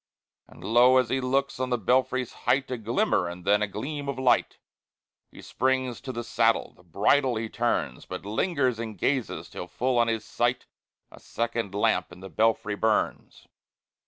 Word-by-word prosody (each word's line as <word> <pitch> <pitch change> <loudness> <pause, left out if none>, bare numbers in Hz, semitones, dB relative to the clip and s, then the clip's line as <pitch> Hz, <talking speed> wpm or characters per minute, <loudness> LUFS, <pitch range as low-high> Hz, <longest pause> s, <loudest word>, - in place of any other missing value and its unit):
And - - -15
lo! 120 +3 +5
as 130 -3 +2
he 130 0 0
looks, 135 +2 0
on 130 0 -1
the 125 - +1
belfry's 130 +2 +1 0.2
height 135 0 +2
A 125 - -1
glimmer, 110 -5 +1
and 85 +1 -8
then 105 +1 +3
a 105 - +1
gleam 140 +8 -5
of 140 - -3
light! 130 -2 +2 0.7
He - - -13
springs 130 -1 -1
to 135 0 -5
the 120 -1 -5
saddle, 115 0 +1
the - - -22
bridle 115 - +2
he 110 0 -3
turns, 110 - -2
But 90 +1 -7
lingers 130 - 0
and 110 -3 -5
gazes, 130 +5 -1
till 90 - -8
full 120 +8 0
on 120 - +3
his 115 -1 -2
sight 120 +1 -1 0.5
A - - -14
second 115 -4 -3
lamp 110 -2 +1
in 85 - -12
the 95 +1 -9
belfry 110 -1 +1
burns! 110 +1 -1
120 Hz, 180 wpm, -26 LUFS, 105-130 Hz, 0.7 s, lo